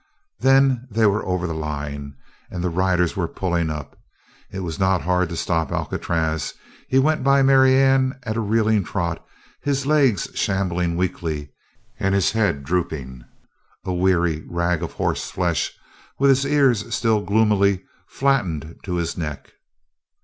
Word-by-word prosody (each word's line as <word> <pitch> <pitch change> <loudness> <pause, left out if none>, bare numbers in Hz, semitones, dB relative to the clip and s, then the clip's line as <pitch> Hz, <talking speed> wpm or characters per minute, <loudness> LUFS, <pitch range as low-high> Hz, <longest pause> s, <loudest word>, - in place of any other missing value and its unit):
Then 135 -1 +3
they 110 0 +2
were 105 +1 +2
over 90 -1 -1
the 85 - -2
line 70 -2 -5 0.3
and 90 -1 -5
the 90 - 0
riders 90 0 +1
were 90 -4 -1
pulling 85 -3 -1
up. 75 -2 -6 0.5
It 95 - -6
was 85 0 -5
not 95 -2 +2
hard 90 0 +1
to 85 - -5
stop 80 -3 -1
Alcatraz. 80 -2 -2 0.3
He 130 - +1
went 150 +1 +2
by 140 0 +4
Marianne 135 0 +4
at 110 -3 -3
a - - -1
reeling 110 -1 +2
trot, 85 -2 -3 0.4
his 140 -1 -1
legs 140 - +3
shambling 90 -3 -1
weakly 80 -5 -3 0.5
and 95 0 +1
his 100 0 +2
head 100 -10 0
drooping, 70 -6 -3 0.6
a 95 - -2
weary 85 -3 +1
rag 85 -1 0
of 85 - -5
horseflesh 85 -6 -1 0.5
with 140 0 +4
his 135 +1 +2
ears 135 -6 +2
still 110 -3 +2
gloomily 100 -1 +2 0.2
flattened 90 - -1
to 90 -2 -2
his 85 -1 -2
neck. 75 -4 -6
95 Hz, 145 wpm, -22 LUFS, 85-115 Hz, 0.6 s, by